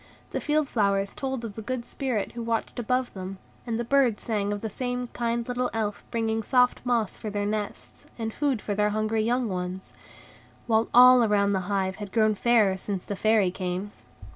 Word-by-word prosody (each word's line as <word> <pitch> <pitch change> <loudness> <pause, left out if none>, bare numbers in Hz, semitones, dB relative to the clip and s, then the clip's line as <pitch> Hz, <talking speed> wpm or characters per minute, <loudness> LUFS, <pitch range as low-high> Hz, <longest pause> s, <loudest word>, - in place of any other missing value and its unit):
The - - -2
field 300 -1 +1
flowers 200 -4 +1
told 265 -3 -4
of 215 - -6
the 220 - -7
good 240 +1 -4
spirit 250 -8 -2
who 235 - -6
watched 230 +2 -2
above 250 +2 0
them, 190 0 -6 0.3
and 230 -1 -1
the - - 0
birds 245 -3 +2
sang 205 -3 -1
of 205 -1 -3
the 225 - -2
same 245 +2 -3
kind 235 -1 -2
little 250 0 -1
Elf 210 -2 -2
bringing 225 -1 -1
soft 250 +2 +3
moss 235 -5 0
for 215 - -5
their 205 0 -2
nests, 210 0 -5
and 225 -1 -3
food 275 -6 0
for 205 - -2
their 210 +1 +2
hungry 215 +1 0
young 240 +2 +1
ones; 185 -1 -5 0.7
while 225 -1 +2
all 250 0 +8
around 200 -2 +2
the 190 0 -2
hive 190 -2 0
had 205 -2 -7
grown 215 -2 +3
fairer 210 -3 +3
since 190 -1 -3
the 205 - -4
Fairy 215 -2 +3
came. 185 +2 -4
220 Hz, 195 wpm, -26 LUFS, 205-245 Hz, 0.7 s, all